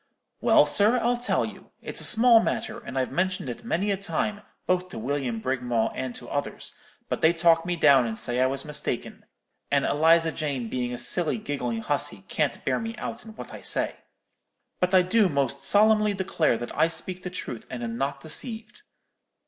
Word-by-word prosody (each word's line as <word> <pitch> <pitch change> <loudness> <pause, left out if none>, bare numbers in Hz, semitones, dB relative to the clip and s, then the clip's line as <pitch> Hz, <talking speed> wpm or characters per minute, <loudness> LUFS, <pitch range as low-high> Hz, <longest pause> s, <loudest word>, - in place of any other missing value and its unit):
"'Well, - - +5
sir, 215 +5 +3
I'll 240 +1 +1
tell 245 +1 0
you. - - -11
It's - - -3
a - - +2
small 235 0 +6
matter, 225 0 -2
and 210 - -8
I've 130 - -1
mentioned 185 -6 -1
it 120 - -7
many 205 -2 -1
a 195 - 0
time, 200 +3 -2 0.2
both 185 0 0
to - - -9
William 125 -1 -2
Brigmawl 125 -2 -1
and 130 -2 -5
to 120 - -10
others; 145 +3 -4 0.3
but - - -3
they 160 - +5
talk 165 0 +3
me 175 - 0
down, 140 -6 +5
and 110 -1 -4
say 120 +3 0
I 130 - +4
was 135 +1 -3
mistaken; 150 -5 -4 0.4
and - - +2
Eliza 165 +2 +3
Jane 140 -8 -3
being 125 0 -2
a 125 - -4
silly 165 - 0
giggling 125 - -3
hussey, - - -2
can't - - -1
bear - - +1
me 225 0 -5
out 230 +1 -6
in 220 -1 -12
what - - -9
I - - -9
say. - - -1 0.8
But 180 +1 +2
I 185 - +6
do 195 +2 +3
most 140 -2 -1
solemnly 215 0 +4
declare 180 -9 0
that 120 - -7
I - - +4
speak 180 +2 -3
the 180 - -5
truth, 125 -10 -7
and 120 -1 -6
am 115 -1 -4
not 135 +2 -3
deceived. 220 - -4
160 Hz, 195 wpm, -26 LUFS, 130-200 Hz, 0.8 s, small